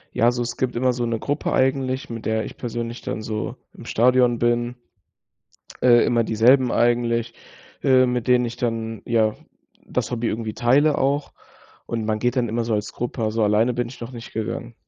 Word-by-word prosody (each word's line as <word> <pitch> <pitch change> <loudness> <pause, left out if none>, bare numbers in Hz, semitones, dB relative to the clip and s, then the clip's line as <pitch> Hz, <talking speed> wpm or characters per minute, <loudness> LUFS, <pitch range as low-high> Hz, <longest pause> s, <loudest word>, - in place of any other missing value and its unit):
Ja, 120 +1 +4
so 120 0 -2
es 120 0 -5
gibt 130 -1 -1
immer 125 +1 +2
so 120 -1 -2
'ne 115 - -1
Gruppe 145 +1 -2
eigentlich, 130 0 0
mit 115 -1 -7
der 110 0 0
ich - - -9
persönlich 120 0 -5
dann 110 - -4
so 110 -1 -4 0.2
im - - -12
Stadion 125 0 +3
bin. 120 +1 0 1.1
Äh, 120 -2 +6
immer 120 -1 +2
dieselben 120 +4 +4
eigentlich, 120 -1 +1 0.5
äh, 130 -1 +5
mit 125 -1 -2
denen 125 -1 +4
ich 120 - -5
dann, 115 -2 -3
ja, 110 -2 +2 0.5
das - - -2
Hobby 120 -1 -1
irgendwie 110 -1 -3
teile 140 +6 +3
auch. 140 +2 0 0.5
Und 115 -2 -3
man 110 0 0
geht 125 +3 0
dann 120 -2 +1
immer 115 +2 -1
so 115 -1 0
als 105 0 -3
Gruppe, 120 0 -4
also 110 0 +1
alleine 110 +4 +2
bin 120 0 -2
ich 125 - -12
noch 120 +1 -6
nicht 120 -1 -9
gegangen. 115 +1 -4
120 Hz, 195 wpm, -22 LUFS, 115-125 Hz, 1.1 s, Äh